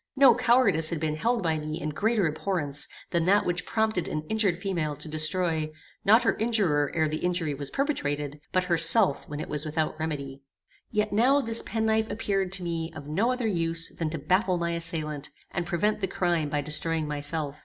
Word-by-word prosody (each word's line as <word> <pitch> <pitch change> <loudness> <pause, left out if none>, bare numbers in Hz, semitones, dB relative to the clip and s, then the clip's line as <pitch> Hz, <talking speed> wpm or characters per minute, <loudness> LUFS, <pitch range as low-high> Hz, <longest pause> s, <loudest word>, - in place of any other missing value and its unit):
No 265 -3 +6
cowardice 235 -9 +4
had 165 - -3
been 155 -1 -2
held 230 +6 -1
by 160 -2 0
me 155 +1 -5
in 155 - -4
greater 210 +6 0
abhorrence 155 -3 -2 0.2
than 170 -1 0
that 200 +3 +3
which 180 +1 -2
prompted 220 -5 -1
an 155 - -4
injured 215 -6 +1
female 175 -6 -3
to 160 - -8
destroy, 155 0 +1 0.3
not 220 +4 +5
her - - +2
injurer 195 -11 0
ere 160 -1 +1
the 155 +1 -3
injury 175 -4 -1
was 140 0 -4
perpetrated, 150 - -3
but 185 - +1
herself 170 0 +7
when 145 0 -6
it - - -5
was 150 -1 -1
without 155 0 -3
remedy. 140 -4 -5 0.5
Yet 210 -1 -1
now 255 +7 +3
this 230 -4 +1
penknife 220 0 -1
appeared 195 -3 -2
to 185 -1 -1
me 165 -1 -4
of 145 -2 -9
no 200 +11 0
other 250 -2 -3
use 165 -5 0
than 165 -2 -3
to 165 - -5
baffle 185 +5 0
my 170 0 -2
assailant, 155 -3 -3 0.2
and 175 -3 -4
prevent 210 +6 -1
the 190 - 0
crime 175 -5 -1
by 145 0 -1
destroying 155 +2 -1
myself. 145 0 -4
170 Hz, 195 wpm, -26 LUFS, 155-205 Hz, 0.5 s, herself